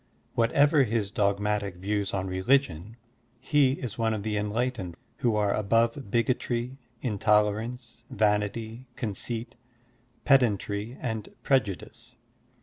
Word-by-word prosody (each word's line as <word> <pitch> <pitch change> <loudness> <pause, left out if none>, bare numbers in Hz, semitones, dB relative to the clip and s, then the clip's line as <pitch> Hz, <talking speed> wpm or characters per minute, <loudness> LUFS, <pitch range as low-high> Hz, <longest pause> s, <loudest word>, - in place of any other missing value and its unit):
What 115 0 +2
ever 145 0 +5
his 110 -4 -1
dogmatic 100 -1 0
views 100 +2 -2
on 95 -1 -2
religion, 95 - 0 0.4
he 135 0 +3
is 125 -5 -6
one 110 -1 +1
of 100 - -5
the 110 -1 -2
enlightened 105 -3 -2 0.2
who 115 -3 +1
are 105 -1 +2
above 115 +3 +2
bigotry^ 120 0 -1 0.3
intol 105 -2 +3
erance, 115 +2 -7
vanity, 110 +3 -1
conceit, 115 +2 -4 0.7
pedantry, 110 -3 +2
and 110 -4 -3
prejudice. 110 -9 -1
110 Hz, 115 wpm, -27 LUFS, 105-120 Hz, 0.7 s, ever